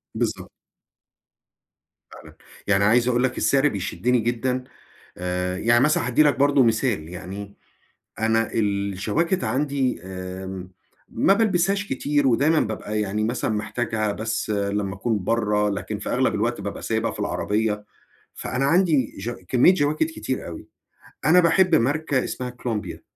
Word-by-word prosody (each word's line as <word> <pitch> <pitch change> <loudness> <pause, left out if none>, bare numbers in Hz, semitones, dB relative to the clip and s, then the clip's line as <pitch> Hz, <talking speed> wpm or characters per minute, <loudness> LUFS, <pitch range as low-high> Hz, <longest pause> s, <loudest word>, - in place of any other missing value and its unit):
بالضبط. - - -2 1.6
فعلًا، - - -13 0.3
يعني 100 -1 +3
عايز 120 +4 +4
أقول 125 0 +2
لك 130 -1 0
السِّعر 140 +1 +3
بيشدني 120 +3 0
جدًا 120 +3 -1 0.5
آآ، 90 0 -2
يعني 120 +4 +4
مثلًا 155 +2 +2
هادّي 125 +5 +4
لك 145 -4 +3
برضو 140 -1 +4
مثال 110 - +1
يعني، 95 +3 -8 0.6
أنا 110 0 +1
الجواكت 105 - 0
عندي 135 - 0
آمم، 95 0 -7 0.4
ما 195 - +3
بالبسهاش 200 -1 +1
كتير، 145 +2 0
ودايمًا 145 +6 +3
بابقى 105 0 -2
يعني 105 +1 -1
مثلًا 120 +1 -1
محتاجها 110 0 -1
بس 110 +1 -3
لمّا 100 -1 -1
أكون 105 0 -2
برّه، 105 -1 +1
لكن 100 - -4
في - - -6
أغلب - - +1
الوقت - - -1
بابقى - - -6
سايبها - - -1
في - - -9
العربيّة، 105 0 -1 0.5
فأنا 130 +2 -2
عندي 165 -3 +2
ج 105 +5 -4 0.2
كميّة 130 - +5
جواكت 155 -3 +1
كتير 130 -5 -4
أوي، 85 - -9 0.6
أنا 175 +4 +7
باحب 175 +1 +4
ماركة 145 0 +1
اسمها 125 -1 -4
كولومبيا، 115 -6 -5
115 Hz, 135 wpm, -23 LUFS, 105-140 Hz, 1.6 s, أنا